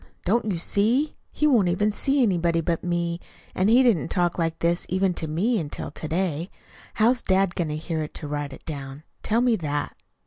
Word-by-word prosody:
Don't 225 +6 +2
you 180 - -1
see? 230 - +1 0.2
He 300 - 0
won't 240 -11 +4
even 205 +5 +1
see 270 +5 +1
anybody 170 -5 +2
but 165 0 -1
me, 170 -1 -1 0.3
and 185 +3 +2
he 245 +3 +6
didn't 225 - +3
talk 175 0 0
like 165 -1 0
this 170 +1 0
even 185 0 +1
to 160 - -4
me 200 +10 +1
until 145 -3 -5
to 155 - -7
day. 170 +1 -1 0.5
How's 240 +3 +3
dad 190 -1 +2
going 175 -3 -1
to 150 - -2
hear 160 0 -3
it 150 - -6
to 150 - -3
write 145 -1 -3
it 135 - -12
down? 140 -1 -6 0.2
Tell 225 +2 +1
me 245 -2 +3
that?" 145 -3 -3
175 Hz, 205 wpm, -25 LUFS, 160-215 Hz, 0.5 s, he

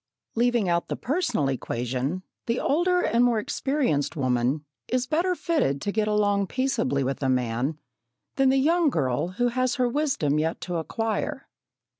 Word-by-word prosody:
Leaving 235 -3 +2
out 170 0 +1
the - - -2
personal 290 - 0
equation, 130 +6 -2 0.2
the 230 +1 0
older 355 +4 +2
and 235 -5 +2
more 240 -2 +3
experienced 210 - 0
woman 130 +1 0 0.2
is 255 0 0
better 340 +7 +1
fitted 300 - 0
to 200 - -2
get 215 0 0
along 205 -2 +2
peaceably 240 - 0
with 135 +2 -2
a 135 - +1
man 125 +3 0 0.6
than 270 -1 +4
the 270 - +3
young 325 +4 +3
girl 145 - 0
who 245 0 +2
has 255 +1 0
her 255 -2 +2
wisdom 240 - 0
yet 160 +2 -1
to 180 -2 -3
acquire. 225 - -2
215 Hz, 160 wpm, -26 LUFS, -, 0.6 s, than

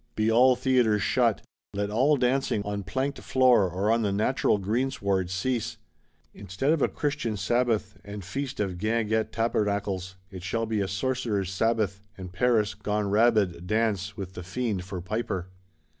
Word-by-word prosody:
Be 110 +1 +1
all 125 +3 +6
Theatres 125 -5 +2
shut; - - +2 0.3
let 100 0 -1
all 135 +7 +3
dancing, 125 -4 +1
on 100 0 -3
planked 135 +8 -2
floor, 125 -7 +4
or 95 +5 0
on 115 0 +2
the 105 -2 0
natural 105 +3 +1
greensward, 100 -3 -1
cease! 110 +5 -2 0.6
Instead 100 - -2
of 160 - -1
a - - +4
Christian 145 -7 -2
Sabbath, 110 0 0
and 100 -2 -8
feast 135 +7 -4
of 95 -4 -2
guinguette 110 +1 0
tabernacles, 100 -4 -1 0.2
it 95 -2 -8
shall 115 +5 -2
be 110 -2 -1
a 100 - -1
Sorcerer's 105 -2 -1
Sabbath; 105 -2 0 0.2
and 95 -1 -8
Paris, 110 -1 +2
gone 105 -1 -2
rabid, 105 -6 +2
dance,—with 100 -3 -1
the 90 - -7
Fiend 100 +1 -2
for 95 -2 -5
piper! 95 -2 -3
105 Hz, 155 wpm, -27 LUFS, 95-120 Hz, 0.6 s, all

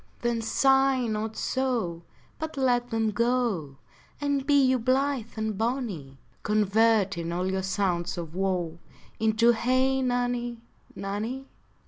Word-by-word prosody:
Then 235 -1 0
sigh 270 +2 +3
not 220 0 -3
so, 235 -11 -1 0.4
But 315 -2 -5
let 245 -2 +2
them 225 -1 0
go, 230 - 0 0.4
And 285 -1 -1
be 285 -1 +5
you 260 -1 +3
blith 255 -1 0
and 220 -1 -2
bonny, 215 - -3 0.2
Converting 210 -4 +2
all 180 +2 -1
your 190 0 -1
sounds 185 -2 -1
of 165 -2 -6
woe 180 -3 -1 0.4
Into 220 +2 +4
Hey 255 +3 +2
nonny, 245 -1 -1 0.4
nonny. 220 +7 -4
225 Hz, 120 wpm, -27 LUFS, 195-255 Hz, 0.4 s, be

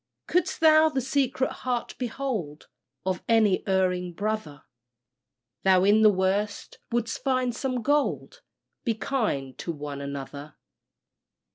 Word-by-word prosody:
Couldst 360 +1 0
thou 315 0 +6
the 275 -3 -1
secret 265 0 0
heart 245 -2 -2
behold 230 - -4 0.4
Of 185 -2 -1
any 220 -4 +4
erring 180 -2 +1
brother, 205 -7 -3 1.0
Thou 185 -1 +4
in 205 +2 +5
the 215 - +8
worst 200 +2 -1
wouldst 235 -1 -2
find 255 -3 +1
some 255 -1 -2
gold 295 - 0 0.4
Be 230 - 0
kind 210 - -2
to 170 - -3
one 145 -2 -6
another. 140 +1 -7
215 Hz, 120 wpm, -26 LUFS, 180-260 Hz, 1.0 s, the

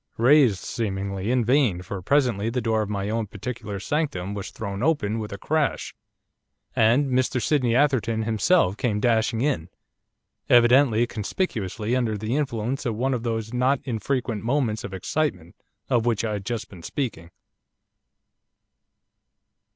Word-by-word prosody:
Raised, 125 -3 +5
seemingly, 100 -2 -3
in 125 -2 +2
vain, 120 -8 +2
for 95 +1 -6
presently 120 -3 +1
the 125 +2 -1
door 110 -2 +1
of 105 - -3
my 100 -1 -2
own 115 -1 -1
particular 105 0 -6
sanctum 100 - -2
was 100 -1 -5
thrown 100 -2 -5
open 120 -8 +1
with 105 -1 -5
a 100 - -5
crash, 155 +5 -1 0.8
and 125 +5 +3
Mr 130 0 +1
Sydney 125 -3 +1
Atherton 120 -5 +2
himself 110 - +2
came 105 -4 0
dashing 115 0 +1
in, 90 - -1 0.8
evidently 120 -1 +5
conspicuously 110 - -2
under 115 -4 0
the 110 +4 -2
influence 130 -2 -2
of 115 -5 -2
one 130 +4 0
of 125 - -2
those 115 -1 -3
not 130 +2 +2
infrequent 120 -2 -2
'moments 120 -3 0
of - - -6
excitement' 95 - -2 0.3
of 120 -1 +1
which 115 -1 +1
I 110 - -1
had 100 -2 -5
just 120 -2 -3
been 90 -4 -13
speaking. 85 - -4
115 Hz, 145 wpm, -24 LUFS, 105-130 Hz, 0.8 s, Raised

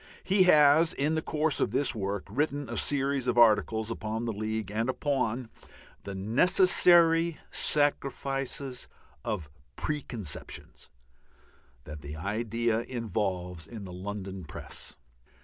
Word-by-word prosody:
He 190 0 +4
has, 155 -1 +6
in 150 +3 0
the 160 - 0
course 155 -1 0
of - - +2
this 140 - +1
work, 100 -3 -3
written 145 +5 -1
a - - -4
series 140 -2 +1
of 120 - +1
articles 110 -1 +4
upon 110 +1 -3
the 115 - -2
League 110 0 -3
and 115 +4 -1
upon 130 -4 -1 0.5
the 100 -1 -5
necessary 165 - +4
sacrifices 135 -2 -1 0.4
of 90 -8 -3 0.3
preconceptions 120 - -6 0.9
that 75 +1 -9
the 75 +1 -7
idea 110 +5 -1
involves 95 -8 -3
in 110 -4 -8
the 90 - -8
London 95 0 -6
press. 75 - -8
115 Hz, 120 wpm, -29 LUFS, 100-145 Hz, 0.9 s, has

